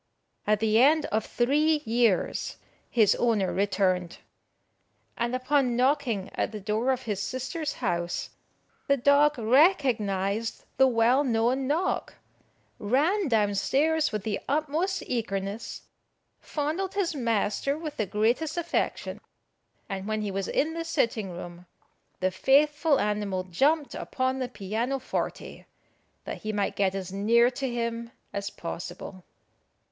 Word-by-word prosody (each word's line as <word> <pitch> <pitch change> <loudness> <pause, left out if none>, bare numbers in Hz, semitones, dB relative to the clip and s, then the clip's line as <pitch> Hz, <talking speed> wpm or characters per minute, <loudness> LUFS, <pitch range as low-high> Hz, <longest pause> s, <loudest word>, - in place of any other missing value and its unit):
At 210 0 +2
the 220 0 +3
end 305 +3 +5
of 220 +1 +1
three 300 +5 +1
years 230 -4 +1 0.3
his 220 -4 +4
owner 220 -6 +1
returned, 185 -3 0 1.0
and 235 +1 -1
upon 255 -1 +1
knocking 250 -6 +1
at - - -1
the 215 - -6
door 215 +5 -1
of 260 0 -2
his 205 -4 -3
sister's 280 - -3
house, 175 0 -2 0.6
the 280 - +3
dog 285 +3 +4
recognised 225 - +2
the 265 - +6
well 245 +3 +3
known 250 +1 +1
knock, 330 +7 -1 0.6
ran 305 - +1
down 210 -5 +2
stairs 310 +9 +1
with 215 -3 -3
the 210 -1 -2
utmost 310 +6 0
eagerness, 200 -3 -3 0.6
fondled 320 +7 -3
his 385 -5 0
master 235 +1 0
with 310 -2 -6
the 215 - -1
greatest 240 - 0
affection; 340 0 -2 0.7
and 195 0 -5
when 215 0 -1
he 205 - -2
was 195 0 -2
in 315 +3 0
the 330 0 -3
sitting 235 - 0
room, 175 0 -9 0.5
the 185 0 +2
faithful 295 - +3
animal 205 -3 -1
jumped 280 - +1
upon 260 0 -2
the 255 -1 -2
piano 230 +5 -2
forte, 260 - -4 0.6
that - - -6
he 215 - -3
might 205 -1 -1
get 195 -1 +1
as 190 -1 -5
near 235 +5 +4
to 265 +1 -3
him 235 -1 -3 0.2
as 200 0 -3
possible. 175 +2 -7
235 Hz, 130 wpm, -27 LUFS, 205-285 Hz, 1.0 s, the